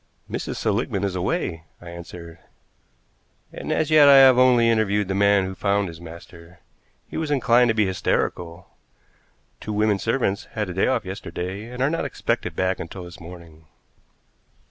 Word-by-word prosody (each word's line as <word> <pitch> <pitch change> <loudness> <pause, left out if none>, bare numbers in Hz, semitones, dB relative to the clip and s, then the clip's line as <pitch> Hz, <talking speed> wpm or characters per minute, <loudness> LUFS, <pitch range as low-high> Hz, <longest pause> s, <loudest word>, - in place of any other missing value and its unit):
"Mrs. - - -5
Seligmann 100 - -1
is 95 -2 -2
away," 90 - -2
I 85 -1 -11
answered, 85 -1 -10 1.1
"and - - -6
as 155 0 0
yet 150 -2 +7
I 140 - +8
have 130 -2 +7
only 125 -2 +5
interviewed 105 -3 +1
the 95 - -2
man 100 0 +3
who 95 - -5
found 100 +1 0
his 85 0 -11
master. 85 +1 -13 0.5
He - - -7
was 160 -1 -3
inclined 125 -3 +3
to 110 - +1
be 110 -2 +2
hysterical. 90 -2 -2 0.9
Two 105 - -6
women 105 -1 +1
servants 115 -3 -1
had 105 -4 -3
a - - -6
day 95 - +1
off 125 -5 0
yesterday, 95 +2 -6
and 125 +1 -3
are 135 - +2
not 165 - -2
expected - - -3
back 95 0 -1
until 90 +2 -7
this 85 -1 -11
morning." 85 -2 -13
100 Hz, 165 wpm, -23 LUFS, 90-115 Hz, 1.1 s, I